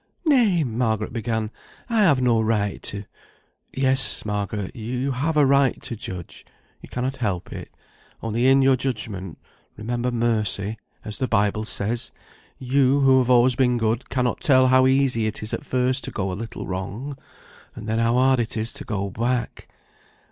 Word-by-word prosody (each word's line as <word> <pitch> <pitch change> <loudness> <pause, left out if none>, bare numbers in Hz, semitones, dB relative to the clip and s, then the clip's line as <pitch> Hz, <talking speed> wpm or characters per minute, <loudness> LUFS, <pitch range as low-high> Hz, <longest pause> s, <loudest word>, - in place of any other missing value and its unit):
"Nay," 230 - +3
Margaret 110 -3 -1
began, 110 -2 -2 0.4
"I 230 -3 +1
have 155 -10 +4
no 120 -3 +2
right 105 -2 -1
to 100 0 -2 0.4
" - - -40 0.3
"Yes, 135 -2 +3
Margaret, 105 -1 -3
you 125 +4 -3
have 150 +5 -1
a 145 - +5
right 140 -1 +3
to 115 - -4
judge; 90 -5 -8 0.4
you - - -13
cannot 130 +2 -3
help 100 -8 -3
it; - - -8 0.5
only 115 +3 0
in 135 0 +5
your 135 0 +5
judgment 105 -9 -4 0.4
remember 120 +3 -2
mercy, 110 -3 -1 0.3
as 105 +2 -6
the 130 - 0
Bible 105 0 +1
says. 110 +2 -2 0.5
You, 135 +1 +2
who 135 -1 +5
have - - -6
been 125 - +4
always 125 0 +3
good, 115 +2 -1
cannot 125 -3 -1
tell 130 -2 +4
how 130 0 +5
easy 130 -4 +2
it 110 0 -5
is 110 - -3
at - - -3
first 130 +1 0
to - - -5
go 95 -2 -3
a - - -3
little 110 +5 -6
wrong, 100 +10 -5 0.6
and - - -8
then 110 +1 0
how 115 +1 +2
hard 130 0 +3
it 115 -1 -2
is 110 +2 -2
to 145 +1 -6
go 100 -3 -3
back. 120 +3 -3
120 Hz, 175 wpm, -23 LUFS, 110-130 Hz, 0.6 s, a